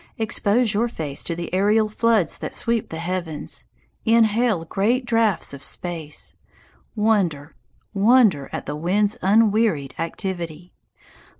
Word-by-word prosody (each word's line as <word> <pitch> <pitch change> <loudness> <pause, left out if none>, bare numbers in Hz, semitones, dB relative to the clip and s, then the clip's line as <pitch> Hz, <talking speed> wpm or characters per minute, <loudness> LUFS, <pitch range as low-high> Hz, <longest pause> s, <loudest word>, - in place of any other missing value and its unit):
Expose 220 +1 +1
your 225 +4 +1
face 150 - -5
to 170 - -3
the 170 +1 -6
aerial 210 +3 +3
floods 215 -3 +1
that - - -5
sweep 235 -2 -1
the 160 - -6
heavens, 170 -2 -4 0.4
"inhale 225 -4 +3
great 230 +9 0
draughts 225 -9 +1
of 140 -1 -9
space," 160 -3 -6 0.6
wonder, 190 -9 +1 0.4
wonder 205 - +4
at - - -5
the 145 - -4
wind's 200 +7 +1
unwearied 205 -8 +2
activity. 175 -1 -4
200 Hz, 120 wpm, -22 LUFS, 165-225 Hz, 0.6 s, wonder